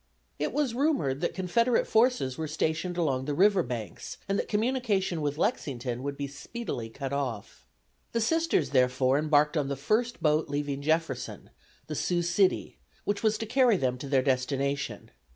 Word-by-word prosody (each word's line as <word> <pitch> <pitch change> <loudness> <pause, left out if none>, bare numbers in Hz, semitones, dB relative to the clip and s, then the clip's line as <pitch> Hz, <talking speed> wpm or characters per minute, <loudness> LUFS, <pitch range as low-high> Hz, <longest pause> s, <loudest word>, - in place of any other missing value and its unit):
It 150 - -1
was 280 -4 0
rumored 235 - +1
that 175 - -1
Confederate 230 +6 +2
forces 225 - +2
were 160 -1 -3
stationed 160 +3 -1
along 135 -6 0
the 145 0 -2
river 195 +2 +5
banks, 120 -5 -6
and 195 0 0
that - - -2
communication 210 -6 0
with 145 0 -1
Lexington 130 - -1
would 140 +1 -4
be 140 - -2
speedily 140 - -6
cut 135 +3 -5
off. 120 - -4 0.4
The 230 - 0
Sisters, 310 - +1
therefore, 130 +1 +3
embarked 150 0 +3
on 145 -3 +1
the 140 - -2
first 225 - 0
boat 155 0 +2
leaving 145 -1 -2
Jefferson, 160 +3 -2 0.3
the - - -5
"Sioux 175 -1 0
City," 175 +3 +1 0.2
which 205 0 -1
was 220 -1 +2
to 225 - -4
carry 245 -2 +4
them 125 -4 -1
to 140 - -6
their 135 -2 +3
destination. 140 +1 -1
155 Hz, 170 wpm, -28 LUFS, 135-210 Hz, 0.4 s, river